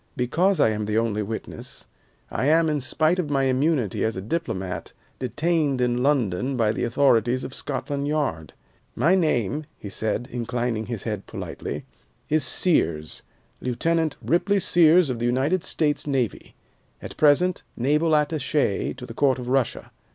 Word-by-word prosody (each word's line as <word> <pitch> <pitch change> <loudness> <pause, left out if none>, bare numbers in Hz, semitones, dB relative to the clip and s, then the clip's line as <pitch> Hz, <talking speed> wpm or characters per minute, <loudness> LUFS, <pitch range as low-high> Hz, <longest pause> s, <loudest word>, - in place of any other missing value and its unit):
Because 170 +9 +1
I 110 - +5
am 105 0 -2
the 105 +1 -1
only 110 -2 0
witness, 110 +2 -7 0.5
I 130 - -1
am, 160 +1 +4
in 150 -2 -1
spite 155 +7 +1
of 160 -5 -1
my 135 -2 +1
immunity 130 - +1
as 110 -3 -1
a - - -3
diplomat, 110 - -4 0.3
detained 145 +2 0
in 125 0 +1
London 130 -2 +1
by 110 -3 +2
the - - -3
authorities 120 0 +2
of 130 - -6
Scotland 140 +1 -3
Yard. 140 - -2 0.4
My 155 +10 +3
name," 155 - +1
he 100 - -8
said, 110 +4 -2
inclining 120 -2 -2
his 115 -4 -4
head 105 -4 -4
politely, - - -6 0.4
"is 155 -1 +2
Sears, 85 - +1 0.4
Lieutenant 160 +5 0
Ripley 195 +4 +2
Sears 170 -3 +4
of 120 - -4
the 120 - 0
United 140 +9 +1
States 150 -1 -1
Navy, 130 -6 -2 0.4
at - - -9
present 160 +5 +3 0.2
Naval 150 +6 +2
Attache 150 -8 0
to 125 -1 -8
the 115 - -9
Court 135 +2 +2
of 125 -1 -6
Russia. 130 -2 0
130 Hz, 155 wpm, -24 LUFS, 115-155 Hz, 0.5 s, I